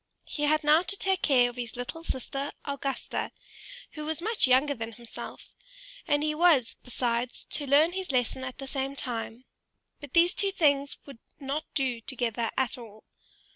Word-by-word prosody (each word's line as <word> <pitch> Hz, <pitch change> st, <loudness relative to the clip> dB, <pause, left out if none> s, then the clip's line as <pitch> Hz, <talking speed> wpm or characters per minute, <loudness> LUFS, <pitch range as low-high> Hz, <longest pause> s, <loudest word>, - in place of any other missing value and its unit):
He 295 Hz, -, -2 dB
had 305 Hz, +1 st, +3 dB
now 305 Hz, +2 st, +6 dB
to 400 Hz, +2 st, +1 dB
take 385 Hz, -1 st, +1 dB
care 250 Hz, -4 st, +5 dB
of 245 Hz, 0 st, -7 dB
his 240 Hz, -2 st, -5 dB
little 245 Hz, +7 st, -5 dB
sister 275 Hz, -1 st, -3 dB
Augusta, 280 Hz, -2 st, -3 dB, 0.6 s
who 305 Hz, -, -6 dB
was 315 Hz, +1 st, -2 dB
much 420 Hz, -, +2 dB
younger 265 Hz, +3 st, +4 dB
than 225 Hz, -2 st, -6 dB
himself, 235 Hz, +1 st, -9 dB, 0.5 s
and 290 Hz, 0 st, +2 dB
he 305 Hz, 0 st, +1 dB
was, 305 Hz, -7 st, +4 dB
besides, 245 Hz, 0 st, -2 dB
to 290 Hz, -, 0 dB
learn 295 Hz, +5 st, +5 dB
his 375 Hz, -3 st, -3 dB
lesson 255 Hz, 0 st, 0 dB
at 255 Hz, -1 st, -5 dB
the 270 Hz, -, -6 dB
same 270 Hz, +1 st, -3 dB
time; 240 Hz, -1 st, -4 dB, 0.5 s
but 290 Hz, -3 st, -10 dB
these 345 Hz, +1 st, +5 dB
two 395 Hz, -1 st, +2 dB
things 285 Hz, -6 st, +2 dB
would 275 Hz, -5 st, -11 dB, 0.2 s
not 285 Hz, +3 st, -3 dB
do 255 Hz, -5 st, 0 dB
together 235 Hz, -2 st, -1 dB
at 260 Hz, 0 st, 0 dB
all. 220 Hz, -2 st, -12 dB
275 Hz, 175 wpm, -28 LUFS, 245-305 Hz, 0.6 s, now